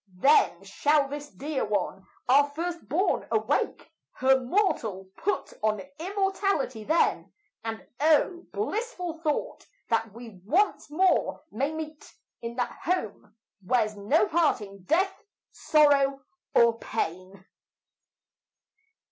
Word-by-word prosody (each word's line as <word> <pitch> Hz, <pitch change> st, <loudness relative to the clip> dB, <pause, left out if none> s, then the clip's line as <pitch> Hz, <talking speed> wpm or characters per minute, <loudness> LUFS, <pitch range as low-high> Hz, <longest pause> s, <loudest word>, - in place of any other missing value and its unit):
Then 195 Hz, -, +4 dB
shall 285 Hz, +8 st, +2 dB
this 290 Hz, +1 st, -7 dB
dear 290 Hz, 0 st, -3 dB
one, 200 Hz, -2 st, -2 dB, 0.2 s
our 285 Hz, +3 st, +5 dB
first 335 Hz, +3 st, -5 dB
born, 355 Hz, +7 st, +1 dB
awake, 220 Hz, +5 st, 0 dB, 0.3 s
Her 265 Hz, +1 st, +3 dB
mortal 245 Hz, -, -1 dB
put 400 Hz, -2 st, -2 dB
on 215 Hz, -1 st, +1 dB, 0.2 s
immortality 385 Hz, -, -1 dB
then; 320 Hz, +9 st, +1 dB, 0.3 s
And 225 Hz, -1 st, -5 dB
oh! 320 Hz, +4 st, +2 dB
blissful 415 Hz, -6 st, -3 dB
thought, 305 Hz, -3 st, -2 dB, 0.2 s
that 225 Hz, -2 st, +1 dB
we 225 Hz, -4 st, -12 dB
once 360 Hz, -, +1 dB
more 365 Hz, +5 st, +2 dB
may 275 Hz, +7 st, -1 dB
meet 310 Hz, -1 st, -8 dB, 0.3 s
In 235 Hz, 0 st, -5 dB
that 245 Hz, -1 st, -3 dB
home 315 Hz, -, -3 dB, 0.3 s
where's 215 Hz, +1 st, +1 dB
no 205 Hz, +1 st, +2 dB
parting, 210 Hz, -, 0 dB
death, 380 Hz, -, +1 dB, 0.3 s
sorrow, 275 Hz, -3 st, +3 dB, 0.3 s
or 235 Hz, -1 st, +5 dB
pain. 185 Hz, -1 st, -4 dB
275 Hz, 110 wpm, -27 LUFS, 220-330 Hz, 0.3 s, our